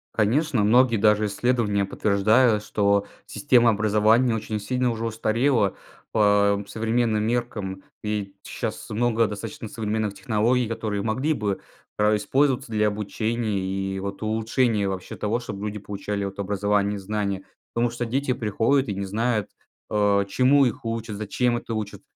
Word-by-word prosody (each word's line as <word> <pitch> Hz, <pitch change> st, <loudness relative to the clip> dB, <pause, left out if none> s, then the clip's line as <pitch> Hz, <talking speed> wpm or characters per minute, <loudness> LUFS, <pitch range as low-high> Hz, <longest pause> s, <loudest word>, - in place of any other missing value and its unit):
Конечно, 120 Hz, +3 st, +2 dB
многие 120 Hz, +3 st, +4 dB
даже 105 Hz, 0 st, +3 dB
исследования 105 Hz, -1 st, +1 dB
подтверждают, 105 Hz, +3 st, +2 dB
что 100 Hz, -1 st, +1 dB, 0.2 s
система 120 Hz, -5 st, +3 dB
образования 110 Hz, +3 st, +3 dB
очень 110 Hz, -1 st, -3 dB
сильно 125 Hz, +3 st, 0 dB
уже 115 Hz, -1 st, -3 dB
устарела, 115 Hz, 0 st, +1 dB, 0.4 s
по 100 Hz, -1 st, +3 dB
современным 115 Hz, -1 st, 0 dB
меркам. 110 Hz, -5 st, -3 dB, 0.2 s
И 105 Hz, -2 st, -3 dB
щас -, -, -5 dB
много 115 Hz, 0 st, +1 dB
достаточно 110 Hz, +4 st, -6 dB
современных 110 Hz, -1 st, -2 dB
технологий, 115 Hz, +3 st, +1 dB
которые 110 Hz, -3 st, -2 dB
могли 130 Hz, +9 st, 0 dB
бы, 105 Hz, -7 st, -2 dB, 0.4 s
а, 105 Hz, 0 st, +3 dB
использоваться 135 Hz, +4 st, +1 dB
для 105 Hz, -1 st, +2 dB
обучения, 110 Hz, +1 st, -2 dB
и 95 Hz, 0 st, -3 dB
вот 100 Hz, +1 st, -5 dB
улучшения 110 Hz, -1 st, +1 dB
вообще 95 Hz, -1 st, -5 dB
того, 110 Hz, +3 st, -1 dB
чтоб 100 Hz, -4 st, -7 dB
люди 105 Hz, 0 st, -4 dB
получали 100 Hz, 0 st, -4 dB
вот 100 Hz, 0 st, -6 dB
образование, 100 Hz, +1 st, 0 dB
и -, -, -4 dB
знания. 100 Hz, -1 st, -2 dB, 0.3 s
Потому 120 Hz, +1 st, +1 dB
что 120 Hz, +1 st, -4 dB
дети 130 Hz, +3 st, -1 dB
приходят 120 Hz, +3 st, +1 dB
и 100 Hz, -, -3 dB
не 100 Hz, -, -3 dB
знают, 110 Hz, +1 st, -1 dB, 0.4 s
а, 100 Hz, -1 st, +2 dB
чему 130 Hz, +7 st, +3 dB
их 120 Hz, -1 st, -3 dB
учат, 115 Hz, -2 st, -3 dB
зачем 120 Hz, +3 st, 0 dB
это 115 Hz, -, -6 dB
учат. 105 Hz, -2 st, -4 dB
110 Hz, 145 wpm, -24 LUFS, 100-120 Hz, 0.4 s, многие